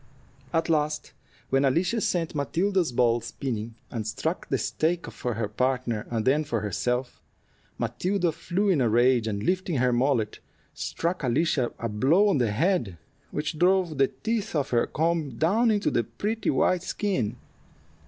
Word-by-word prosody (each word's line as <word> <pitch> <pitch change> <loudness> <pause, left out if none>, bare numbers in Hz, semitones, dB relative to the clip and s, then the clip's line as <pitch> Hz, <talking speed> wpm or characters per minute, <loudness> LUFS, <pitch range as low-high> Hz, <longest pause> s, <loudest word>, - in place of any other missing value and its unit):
At 165 0 +1
last 150 -2 0 0.4
when 135 +1 +3
Alicia 175 - +2
sent 170 -3 0
Matilda's 170 +3 0
ball 120 -1 +2
spinning, 115 -4 -4 0.2
and 110 -3 -3
struck 110 - -3
the - - +1
stake 170 +2 -1
for 120 -2 -3
her 110 -1 -1
partner 125 -1 -1
and 115 -2 -1
then 145 +4 +3
for 115 -7 -2
herself, 125 +5 -2 0.6
Matilda 170 - 0
flew 195 +6 -1
in 165 -8 +3
a 120 - +3
rage, 120 0 +3
and 100 -1 -2
lifting 185 0 0
her 125 -1 +2
mallet, 120 -4 +1 0.3
struck 170 +2 -2
Alicia 130 0 +1
a 115 - -3
blow 140 - +3
on 150 - +2
the 120 -3 +2
head, 120 - 0 0.3
which 150 +1 -3
drove 180 -4 +2
the 135 - +5
teeth 210 - -3
of 140 -3 0
her 120 -1 +2
comb 160 -6 -1
down 215 +9 +3
into 205 -2 +1
the 120 - +1
pretty 205 - -2
white 180 -1 +2
skin. 150 - -1
140 Hz, 160 wpm, -26 LUFS, 120-175 Hz, 0.6 s, the